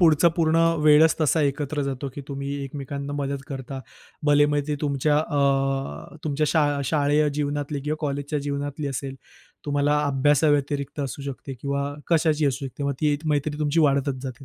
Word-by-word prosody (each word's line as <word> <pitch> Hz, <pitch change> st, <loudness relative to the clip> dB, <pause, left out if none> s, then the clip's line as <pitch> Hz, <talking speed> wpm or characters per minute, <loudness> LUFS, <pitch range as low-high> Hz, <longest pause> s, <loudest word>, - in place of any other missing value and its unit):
पुढचा 165 Hz, 0 st, +6 dB
पूर्ण 165 Hz, -1 st, +2 dB, 0.3 s
वेळच 155 Hz, +1 st, +6 dB
तसा 155 Hz, +1 st, +3 dB
एकत्र 145 Hz, +1 st, -1 dB
जातो, 140 Hz, 0 st, -3 dB
की 145 Hz, -, -6 dB
तुम्ही 140 Hz, 0 st, -4 dB
एकमेकांना 140 Hz, +1 st, -5 dB
मदत 140 Hz, -1 st, -3 dB
करता, 135 Hz, -2 st, -6 dB, 0.5 s
भलेही 145 Hz, 0 st, +5 dB
मग 145 Hz, 0 st, +2 dB
ते 150 Hz, -, +1 dB
तुमच्या 145 Hz, 0 st, +1 dB
अ, 135 Hz, -, 0 dB
तुमच्या 150 Hz, 0 st, 0 dB
शा 160 Hz, -1 st, +3 dB, 0.2 s
शाळेय 145 Hz, +1 st, +2 dB
जीवनातली 145 Hz, 0 st, -2 dB
किंवा 150 Hz, +2 st, -2 dB
कॉलेजच्या 145 Hz, 0 st, -2 dB
जीवनातली 145 Hz, +1 st, -3 dB
असेल 135 Hz, 0 st, -4 dB, 0.5 s
तुम्हाला 145 Hz, +1 st, +2 dB
अभ्यासाव्यतिरिक्त 145 Hz, 0 st, +1 dB
असू 140 Hz, 0 st, -4 dB
शकते 135 Hz, 0 st, -6 dB
किंवा 140 Hz, +1 st, -2 dB, 0.2 s
कशाची 155 Hz, -2 st, +3 dB
असू 140 Hz, 0 st, -1 dB
शकते 135 Hz, +2 st, -8 dB
मग 140 Hz, -, +1 dB
ती 150 Hz, -2 st, +2 dB
मैत्री 150 Hz, 0 st, 0 dB
तुमची 150 Hz, +2 st, +1 dB
वाढतच 140 Hz, -3 st, +1 dB
जाते 130 Hz, 0 st, -7 dB
145 Hz, 160 wpm, -24 LUFS, 140-150 Hz, 0.5 s, पुढचा